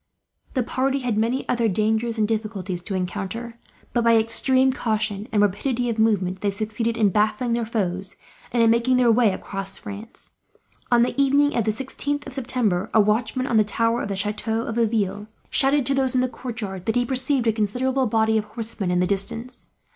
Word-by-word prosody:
The 255 - +2
party 270 +3 -1
had 245 -4 -1
many 230 +5 0
other 235 -2 +1
dangers 220 +3 0
and 215 -1 +2
difficulties 210 -5 -3
to 200 - -3
encounter 205 +6 -4 0.3
but, 240 - +1
by 230 0 +5
extreme 260 +4 +3
caution 215 -4 -2
and 210 -1 +3
rapidity 240 +5 0
of 225 -1 -2
movement, 190 -4 +1
they 205 - +1
succeeded 220 +3 -2
in 215 -3 +4
baffling 215 +5 +1
their 235 -1 -1
foes, 190 -4 -2 0.4
and 235 -1 +3
in 225 - +5
making 235 +2 +2
their 245 -2 +4
way 225 -2 +4
across 195 +1 -4
France. 210 +2 -8 0.5
On 240 -1 +5
the 245 - 0
evening 285 +1 +3
of 235 - +1
the 215 - +2
16th 285 +5 -3
of 275 - -8
September, 230 -7 0
a - - +7
watchman 225 +5 +1
on 230 -4 +2
a - - +5
tower 230 +3 0
of - - -3
the 200 - -3
chateau 215 +3 -1
of 225 - -4
Laville 210 -3 0 0.2
shouted, 275 -1 +3
to 275 - +1
those 265 -2 +1
in 255 - +4
the 255 - +1
courtyard, 220 -7 -6
that 225 - +1
he 245 0 +2
perceived 260 0 0
a 225 - +3
considerable 250 +5 0
body 220 0 +2
of 210 - -5
horsemen 220 -3 -4
in 180 0 +2
the - - +3
distance. 225 +6 -3
225 Hz, 200 wpm, -23 LUFS, 210-245 Hz, 0.5 s, a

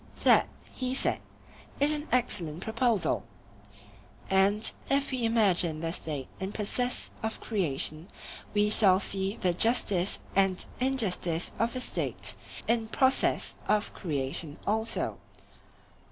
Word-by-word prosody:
That, - - +6 0.2
he 255 0 -1
said, - - +2 0.6
is 290 +2 +4
an 300 +1 -4
excellent 175 -10 0
proposal. 220 -6 0 1.1
And 200 +3 +3 0.2
if 275 0 +1
we 250 -3 -1
imagine 190 -8 +2
the 165 0 -2
State 145 -6 -4
in 190 +1 -4
process 245 +4 -2
of 220 0 -3
creation, 160 - -1 0.4
we 210 0 +2
shall 190 -3 +7
see 195 +1 -2
the 180 -2 +2
justice 200 -2 +2 0.2
and 190 -1 +2
injustice 200 -10 0
of 230 +1 +1
the 255 - -3
State - - -1 0.3
in 230 -1 +1
process 260 +3 +1
of 210 0 +1
creation 145 -1 -2
also. 220 +2 -1
205 Hz, 120 wpm, -29 LUFS, 175-235 Hz, 1.1 s, shall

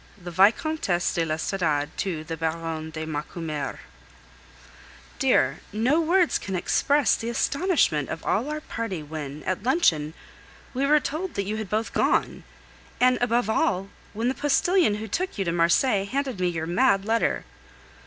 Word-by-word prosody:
THE 175 -1 -8
VICOMTESSE 195 - +2
DE 165 - 0
L'ESTORADE 155 -2 -1
TO 170 -5 -3
THE 165 0 -5
BARONNE 160 0 -3
DE 160 0 -5
MACUMER 150 -2 -4 1.4
Dear, - - +2
no 250 +10 +2
words 345 +1 +2
can 190 - -4
express 285 +9 +2
the 230 - -4
astonishment 280 - +1
of 165 - -6
all 240 +8 0
our 305 0 -3
party 225 - -4
when, 150 -1 -7
at 185 - -2
luncheon, 175 - +2 0.6
we 270 +2 0
were 300 +1 +5
told 315 +6 -4
that 200 - -1
you 215 +2 -3
had 220 -3 -5
both 220 +1 -1
gone, - - +1 0.6
and, 250 +1 +4
above 240 -2 +2
all, 195 -3 0 0.2
when 225 +3 -1
the 255 - +1
postilion 295 - +2
who 215 +1 -5
took 360 - -3
you 195 - -1
to 170 - 0
Marseilles 195 +5 +2
handed 265 -5 -2
me 180 - +1
your 165 -2 -2
mad 195 +2 +2
letter. 230 +1 0
200 Hz, 155 wpm, -25 LUFS, 165-260 Hz, 1.4 s, were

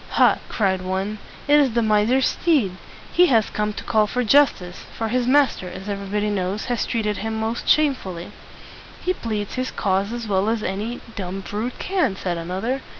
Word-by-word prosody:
"Ha!" - - +4
cried 190 -3 0
one, 190 +3 -3 0.3
"it 295 +1 +6
is 270 -5 +3
the 235 0 +2
miser's 220 +5 +3
steed. 290 - +2 0.4
He 355 0 +6
has 225 -7 +3
come 210 0 -1
to - - -7
call 215 -1 +2
for 250 +4 -1
justice; 230 -8 +2
for 225 -1 -2
his 245 +1 0
master, 260 -9 +3
as 190 +2 -9
everybody 205 +1 -2
knows, 195 +1 -2
has 245 -2 -1
treated 210 -3 -1
him 220 0 -3
most 225 +2 -2
shame 300 -2 +5
ful 190 -8 -7
ly." 170 +1 -8 0.7
"He 365 - 0
pleads 215 - -4
his 255 0 -2
cause 195 +1 0
as 235 -1 -5
well 200 +1 +1
as 225 -1 -1
any 210 +6 -3
dumb 195 -1 -4
brute 215 +5 -4
can," 360 - 0
said 180 -3 -3
another. 190 +10 -2
215 Hz, 190 wpm, -22 LUFS, 195-245 Hz, 0.7 s, it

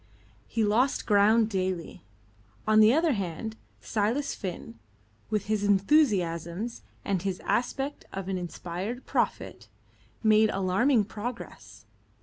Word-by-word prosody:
He 225 - 0
lost 230 +6 +2
ground 215 +2 +4
daily. 185 - -3 0.6
On 215 0 +4
the 215 +1 +7
other 320 +4 +3
hand, 200 +2 -4 0.3
Silas 225 +7 -1
Finn, 175 - -7 0.5
with 210 -2 -1
his 215 -1 -1
enthusiasms, 200 - +1 0.2
and 195 -3 0
his 190 -1 -3
aspect 270 +4 -2
of 195 -1 -5
an 190 -1 -2
inspired 180 +7 -5
prophet, - - -2 0.6
made 215 0 +5
alarming 205 +6 +2
progress. 230 +3 -8
210 Hz, 115 wpm, -28 LUFS, 190-230 Hz, 0.6 s, the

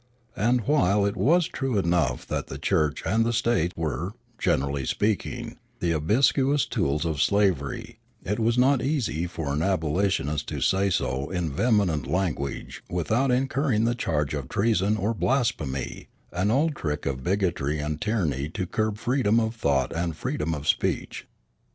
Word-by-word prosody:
And, 120 +5 +2
while 105 -7 +2
it 100 0 0
was 155 - +3
true 135 -5 -2
enough 85 -9 +1
that - - -3
the - - -6
Church 75 -2 0
and 110 +3 +2
the 115 - +1
State 115 -7 +1
were, 80 +4 -2 0.3
generally 70 0 0
speaking, 105 - -2 0.2
the 85 - 0
obsequious 130 - +2
tools 75 +4 -1
of 80 -4 -1
slavery, 90 -5 0 0.3
it 105 +3 -1
was 115 +2 +2
not 130 +1 +4
easy 125 - -1
for 80 -5 -4
an 75 - 0
abolitionist 80 -4 0
to - - -4
say 95 +1 +2
so 70 -6 -1
in 90 -4 -2
vehement 100 - +1
language 80 -7 -2
without 110 - +1
incurring 130 -2 +1
the 120 - +2
charge 75 - -1
of 70 -3 -4
treason 105 -1 +2
or 110 +2 0
blasphemy, 105 - -1 0.2
an 90 +4 0
old 145 +6 +2
trick 75 - -3
of 65 -1 -2
bigotry 85 -6 0
and 75 +1 -3
tyranny 80 - -1
to 90 +3 -3
curb 110 +3 -1
freedom 120 -2 +2
of 110 0 -1
thought 70 - +1
and 85 -1 -1
freedom 80 +2 -2
of 75 0 -6
speech. - - -1
95 Hz, 155 wpm, -26 LUFS, 75-115 Hz, 0.3 s, not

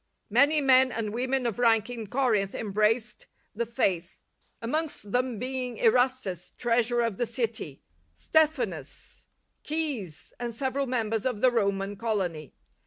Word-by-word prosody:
Many 285 +7 +4
men 260 -1 +5
and 220 -3 -3
women 255 +2 0
of 235 -1 -2
rank 225 -3 +4
in 235 -3 -6
Corinth 215 -5 +1
embraced 215 +2 0 0.3
the 235 +2 -2
Faith, 190 -7 -1 0.4
amongst 285 -4 -3
them 250 -1 0
being 250 0 -3
Erastus, 245 -6 +1
treasurer 240 0 +2
of 230 -4 -2
the 240 - 0
city, 225 - -3 0.3
Stephanas, 240 - -1 0.4
Caius, 280 - -3
and 240 -2 -4
several 270 +2 -1
members 225 -3 -1
of 250 -5 -2
the 255 - +5
Roman 200 -3 0
colony. 185 - -2
235 Hz, 130 wpm, -27 LUFS, 210-255 Hz, 0.4 s, men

